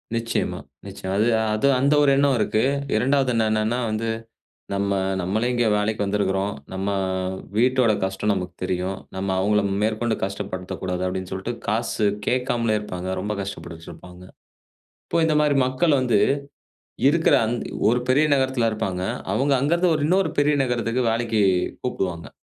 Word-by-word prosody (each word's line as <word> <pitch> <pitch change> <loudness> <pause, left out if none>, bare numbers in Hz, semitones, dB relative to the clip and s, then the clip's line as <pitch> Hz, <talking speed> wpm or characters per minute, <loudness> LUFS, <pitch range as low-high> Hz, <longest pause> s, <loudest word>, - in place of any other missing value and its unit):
நிச்சியமா, 115 0 -2 0.3
நிச்சியமா. 95 0 -5
அது 110 - +3 0.3
அது 125 +6 +1
அந்த 140 +3 +3
ஒரு 140 - +4
எண்ணம் 140 -2 +3
இருக்கு. 110 +1 +1 0.3
2வது 135 +3 +2
என்னன்னா 110 +2 +1
வந்து, 110 +1 -2 0.6
"நம்ம 100 0 0 0.3
நம்மளே 110 +7 0
இங்கே 120 -2 +2
வேலைக்கு 105 0 -1
வந்துருக்குறோம். 100 0 0 0.2
நம்ம 95 +1 -3 0.7
வீட்டோட 125 -1 +3
கஷ்டம் 95 +2 -1
நமக்கு 90 -2 -4
தெரியும். 95 +1 -2 0.2
நம்ம 95 +1 -2
அவுங்கள 105 +1 +2 0.2
மேற்கொண்டு 110 +1 0
கஷ்டப்படுத்த 95 -1 -5
கூடாது." 90 0 -2
அப்டின்னு 95 0 -4
சொல்ட்டு, 95 +6 -4
காசு 110 -1 0 0.2
கேக்காமலே 120 -3 +1
இருப்பாங்க. 95 -3 -5
ரொம்ப 105 +1 -3
கஷ்டப்பட்டுட்டுருப்பாங்க. 90 -1 -9 0.8
இப்போ - - 0
இந்த 155 -1 +1
மாரி 150 -2 +2
மக்கள் 140 +4 +2
வந்து, 120 -5 +2 0.9
இருக்குற 165 +2 +3
அந் 115 - -1 0.4
ஒரு 125 +1 +2
பெரிய 145 +4 +4
நகரத்துல 130 -3 +1
இருப்பாங்க. 95 -4 -3 0.3
அவங்க 135 +5 +2
அங்கருந்து 170 +4 +2
ஒரு 150 - -2
இன்னொரு 190 +3 +2
பெரிய 150 +1 +3
நகரத்துக்கு 120 -1 -1
வேலைக்கு 115 -1 0 0.4
கூப்டுவாங்க, 90 -9 -3
110 Hz, 140 wpm, -23 LUFS, 95-130 Hz, 0.9 s, ஒரு